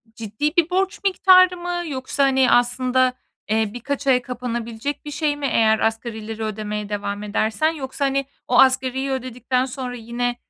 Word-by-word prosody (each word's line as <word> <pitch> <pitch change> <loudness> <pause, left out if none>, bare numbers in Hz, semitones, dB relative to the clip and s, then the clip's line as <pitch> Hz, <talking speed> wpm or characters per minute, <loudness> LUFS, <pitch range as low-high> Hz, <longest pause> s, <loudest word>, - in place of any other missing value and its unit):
ciddi 230 - -3
bir 340 -2 +3
borç 385 +2 0
miktarı 370 -1 +5
mı 350 0 -3
yoksa, 270 0 -2
hani, 265 -1 +3
aslında, 255 +1 +2 0.4
eee, 220 0 +1
birkaç 275 +3 -4
aya 255 -2 +4
kapanabilecek 240 +2 -5
bir 295 - -6
şey 295 0 0
mi 290 -1 -4
eğer 220 -1 +3
asgarileri 225 -1 -3
ödemeye 210 -1 -4
devam 205 0 -4
edersen? 220 +8 0
Yoksa, 280 -2 -4
hani, 275 0 0 0.2
o 250 - +3
asgariyi 265 +1 +3
ödedikten 255 0 -1
sonra 255 -1 -6
yine, 240 +1 -3
255 Hz, 155 wpm, -22 LUFS, 225-280 Hz, 0.4 s, miktarı